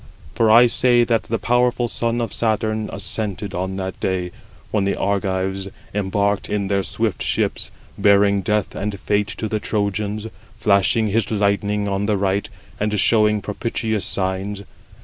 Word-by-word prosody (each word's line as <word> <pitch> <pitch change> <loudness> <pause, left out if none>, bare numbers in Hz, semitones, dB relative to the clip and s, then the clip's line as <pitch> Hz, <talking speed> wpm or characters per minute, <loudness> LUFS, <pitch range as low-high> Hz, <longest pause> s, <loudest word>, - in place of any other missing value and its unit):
For 115 -1 +2
I 115 +3 +8
say 120 0 +4
that 115 -2 +1
the 115 - -1
powerful 120 0 +1
son 115 0 -1
of 115 -4 -3
Saturn 110 -1 0
assented 105 -2 -3
on 95 +1 -3
that 95 -1 -4
day, 90 -1 -1 0.4
when 105 -2 +1
the 100 - 0
Argives 95 -1 -1 0.3
embarked 100 0 0
in 100 -2 -1
their 100 -1 +2
swift 110 0 -2
ships, - - -1 0.3
bearing 100 0 +4
death 105 +1 0
and 100 -1 -4
fate 105 0 0
to 110 - -2
the 110 0 -1
Trojans, 105 0 -1 0.3
flashing 100 +2 +3
107 110 +1 0
his - - -1
lightning 100 0 +1
on 100 +1 -1
the 105 -2 +2
right, 100 +1 0 0.3
and 105 0 0
showing 105 -1 +3
propitious 110 0 -2
signs. 95 +1 -2
105 Hz, 155 wpm, -21 LUFS, 100-110 Hz, 0.4 s, I